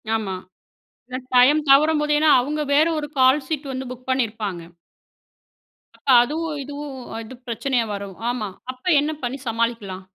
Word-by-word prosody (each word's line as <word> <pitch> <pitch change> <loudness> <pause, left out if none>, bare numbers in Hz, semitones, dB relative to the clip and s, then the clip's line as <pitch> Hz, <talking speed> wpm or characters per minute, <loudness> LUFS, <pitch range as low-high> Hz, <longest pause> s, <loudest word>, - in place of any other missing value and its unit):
ஆமா. 200 -4 -2 0.7
இல்ல 255 0 -4 0.2
டைம் 260 +5 +6
தவறும்போது 300 +2 +4
ஏன்னா 310 +1 +4
அவங்க 295 +4 -2
வேற 300 +3 +5
ஒரு 295 -1 -3
கால்ஷீட் 275 +2 +2
வந்து 260 0 -4
புக் 255 0 -11
பண்ணியிருப்பாங்க. 220 -8 -1 1.3
அப்ப - - -8
அதுவும் 305 +3 -3
இதுவும் 285 0 -7 0.3
எது 225 +3 -10
பிரச்சனையா 240 +1 0
வரவும் 200 -1 -7
ஆமா 225 -5 -2 0.2
அப்ப 255 +5 -27
என்ன 295 +2 0
பண்ணி 245 +2 -2
சமாளிக்கலாம்? 225 -5 -2
260 Hz, 135 wpm, -22 LUFS, 225-295 Hz, 1.3 s, டைம்